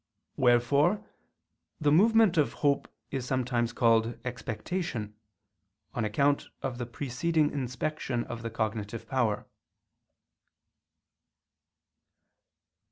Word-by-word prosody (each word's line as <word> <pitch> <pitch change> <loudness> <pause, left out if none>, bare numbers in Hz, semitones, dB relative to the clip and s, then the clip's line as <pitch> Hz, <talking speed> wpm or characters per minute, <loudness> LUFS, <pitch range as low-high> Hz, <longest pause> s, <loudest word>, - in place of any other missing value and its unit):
Wherefore 140 - +3 0.7
the 150 -2 +3
movement 215 +3 +5
of 150 -3 +2
hope 140 -1 +2 0.2
is 135 - -2
sometimes 125 -2 0
called 115 0 +2
expectation, 120 - -4 0.8
on 115 - -1
account 140 +7 +1 0.2
of 125 -2 -3
the 120 - -3
preceding 145 +5 0
inspection 130 -1 -2
of 120 -1 -7
the 115 - -4
cognitive 110 0 -3
power. 120 -6 0
125 Hz, 90 wpm, -29 LUFS, 115-145 Hz, 0.8 s, movement